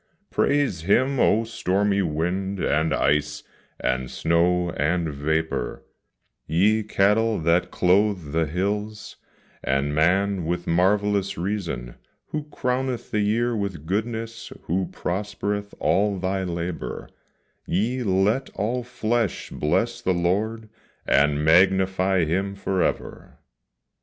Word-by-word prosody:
Praise 140 - +1
Him, 130 +9 +2
O 115 0 +4
stormy 100 -2 0
wind, 90 +4 -2
and 80 0 +1
ice, 75 0 +1 0.4
and 65 0 -1
snow, 85 +1 +1
and 80 +1 0
vapor, 80 -3 -2 0.6
Ye 100 +8 +3
cattle 105 +2 +2
that 85 +2 +2
clothe 90 -3 +2
the 80 0 +1
hills, 105 +6 -3 0.5
and 70 +2 0
man 95 +4 +2
with 85 0 -2
marvellous 100 +2 +1
reason; 85 -10 -3 0.3
Who 150 -1 -3
crowneth 130 -3 -2
the 105 - +1
year 115 +3 +1
with 100 -7 -4
goodness, 115 +4 -3
who 90 +2 -1
prospereth 100 +2 -3
all 100 0 +2
thy 95 +1 -1
labour, 85 0 -4 0.6
Yea, 115 +8 0
let 105 +5 +1
all 115 +5 -1
flesh 120 -4 -2
bless 75 0 0
the 95 - +1
Lord, 105 +6 -1 0.4
and 75 +1 +3
magnify 95 +1 +4
Him 95 +5 -1
forever! 95 -1 -2
95 Hz, 110 wpm, -24 LUFS, 85-105 Hz, 0.6 s, O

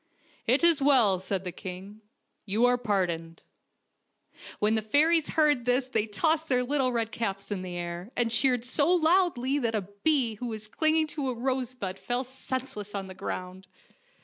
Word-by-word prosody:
" - - -31
It 255 +7 +3
is 335 -4 +5
well," 245 -10 +4
said 190 0 -3
the 180 - -4
king, 190 +4 -9 0.2
" - - -50
you 215 +5 +2
are 245 0 +4
par 205 -6 +1
doned." 165 -1 -6 1.2
When 210 +1 +2
the 220 - +1
fairies 305 +8 +3
heard 295 -5 +3
this 250 +1 +1
they 220 -3 0
tossed 315 +10 0
their 250 -2 +2
little 265 0 0
red 230 -2 -1
caps 200 -3 -4
in 195 -3 -2
the 180 -1 -6
air, 175 +2 -5
and 235 -2 +1
cheered 245 +1 +2
so 285 +5 +3
loudly 320 -6 +2
that 230 -4 -1
a 210 - -1 0.2
bee 260 -9 +2
who 245 - -4
was 215 -2 -5
clinging 315 +6 +1
to 285 -3 -3
a 250 - -3
rose 255 0 -2
bud 195 -5 -5
fell 245 +1 -2
senseless 260 -5 -5
to 200 -1 -3
the 190 0 -9
ground. 185 0 -6
240 Hz, 190 wpm, -28 LUFS, 200-270 Hz, 1.2 s, is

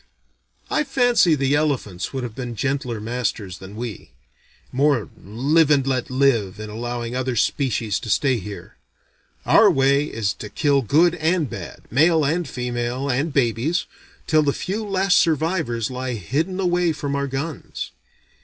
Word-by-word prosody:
I 300 - +2
fancy 245 - +3
the 135 -1 +1
elephants 135 - -1
would 130 -2 -4
have 120 -3 -5
been 120 -1 -5
gentler 130 -2 -2
masters 110 -5 -3
than 95 +2 -10
we: 115 -3 -6 0.6
more 135 -4 +2
live 140 - +2
and 140 -3 +3
let 130 -3 -1
live 130 -8 +1
in 105 0 -6
allowing 120 +1 -4
other 130 -1 -1
species 115 -3 0
to 110 - -8
stay 130 +4 +2
here. 105 0 -9 0.7
Our - - +6
way 140 +2 +3
is 110 -8 -2
to 105 - -6
kill 140 +4 +2
good 160 +8 +3
and 165 -1 +1
bad, - - -8
male 155 +4 +4
and 165 +4 0
female 125 +2 -2
and 140 +6 0
babies, 130 +5 +1 0.4
till 155 -1 +4
the 145 -2 +1
few 205 +4 -3
last 195 -2 +3
survivors 155 - 0
lie 130 0 -3
hidden 155 - -2
away 175 -2 +2
from 145 -2 -3
our 140 0 -1
guns. 140 +4 -5
135 Hz, 155 wpm, -22 LUFS, 120-155 Hz, 0.7 s, Our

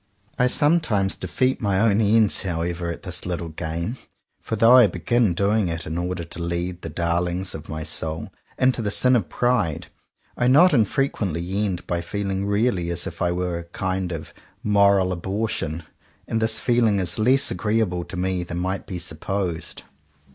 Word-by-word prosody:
I 125 - +4
sometimes 130 - +2
defeat 130 +9 -1
my 100 -3 +1
own 110 0 +3
ends 110 0 +3
however 85 -1 -2
at 85 - -6
this 90 -2 -3
little 85 -2 -3
game; 85 +8 -4 0.4
for 110 - -3
though 115 +3 +6
I 125 -4 +8
begin 115 0 +1
doing 100 +1 +2
it 80 -1 -4
in 80 - -4
order 90 0 -2
to 85 +1 -8
lead 85 +1 -3
the - - -6
darlings 85 +2 -1
of 80 0 -9
my 80 0 -4
soul 80 +1 -1 0.2
into 130 -2 +2
the 105 - -1
sin 125 +5 +3
of 105 -7 0
pride, 120 -11 0 0.5
I 125 - +1
not 160 +7 +6
infrequently 100 - 0
end 90 -3 -3
by 85 -1 -2
feeling 100 +1 -3
really 100 -4 +1
as 85 0 -2
if - - -7
I 90 -1 +2
were 90 -1 -2
a - - -7
kind 95 +1 -3
of 80 -2 -7 0.3
moral 100 -2 +4
abortion. 90 -3 -3 0.4
And 115 - -1
this 110 0 +3
feeling 120 -4 +2
is 95 +2 -2
less 130 +5 +4
agreeable 105 -5 0
to 95 - -7
me 90 0 -1
than 85 0 -5
might 95 +2 -3
be 95 - -5
supposed. 85 0 -4
95 Hz, 175 wpm, -23 LUFS, 85-110 Hz, 0.5 s, I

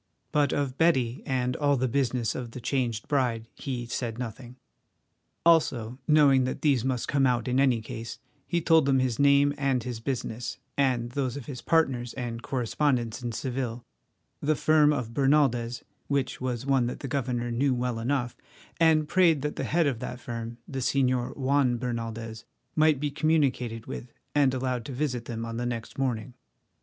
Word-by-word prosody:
But 145 -1 +2
of 140 -2 -2
Betty 130 -8 +2
and 125 -1 0
all 145 -1 +2
the 130 +1 +1
business 125 -2 0
of 125 -2 -5
the - - -6
changed 120 -3 -1
bride 120 -5 0
he 125 -3 -4
said 120 -1 -3
nothing. 120 +1 -7 0.9
Also, 130 -8 +3
knowing 145 -4 +5
that 130 - -4
these 140 -6 +3
must 130 -2 -1
come 140 -2 +3
out 120 -1 0
in 125 +1 +2
any 130 -4 +3
case, 115 +1 -6 0.3
he 170 -1 0
told 160 -3 +4
them 135 -1 +4
his 130 -3 0
name 140 0 +5
and 135 -4 +1 0.2
business, 120 -3 -3 0.2
and 125 -4 +1
those 130 -1 -2
of 135 - -7
his 125 -3 -7
partners 130 -7 +1
and 120 -2 -4
correspondents 125 -1 0
in 120 -1 -3
Seville, 125 -1 -3 0.6
the 155 +1 +2
firm 150 0 +4
of 125 -6 -2
Bernaldez, 130 -4 +2 0.2
which 135 -3 -1
was 125 -1 -2
one 135 -3 +2
that 125 - -5
the 140 - -4
governor 125 -3 -2
knew 130 +2 +1
well 125 -1 -2
enough, 125 0 -1 0.4
and 160 -2 +4
prayed 165 -5 +3
that 150 - -2
the - - -3
head 170 +1 +2
of 135 -6 0
that 125 - -5
firm, 115 -1 -6
the 135 - -4
Señor 130 -1 +1
Juan 135 -2 +2
Bernaldez, 115 -2 -4 0.3
might 155 -2 +4
be 145 0 -1
communicated 130 -8 0
with 120 - -7 0.2
and 145 -3 +4
allowed 125 -2 -1
to 135 - -6
visit 125 -3 -2
them 115 -1 -4
on 115 0 -5
the 120 - -2
next 115 +1 -5
morning. 125 -2 -1
130 Hz, 175 wpm, -27 LUFS, 120-140 Hz, 0.9 s, knowing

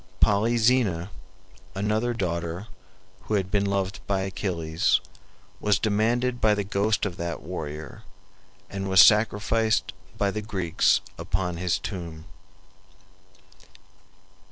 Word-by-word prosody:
Polyxena, 110 -3 +2 0.6
another 105 +4 0
daughter, 85 -1 -3 0.6
who 110 - 0
had 95 -2 -1
been 100 -1 +1
loved 95 0 -1
by 100 -1 +1
Achilles, 85 -4 0 0.6
was 105 -2 +2
demanded 120 +4 0
by 105 -1 +4
the 100 - -1
ghost 100 +2 0
of 90 -4 -4
that 85 0 -4
warrior, 80 -2 -6 0.7
and 95 0 -4
was 95 0 +5
sacrificed 110 +1 +4 0.2
by 100 -1 +1
the 105 - -3
Greeks 95 -6 +1 0.2
upon 90 -2 -2
his 90 0 0
tomb. 85 -4 -7
100 Hz, 105 wpm, -26 LUFS, 90-105 Hz, 0.7 s, was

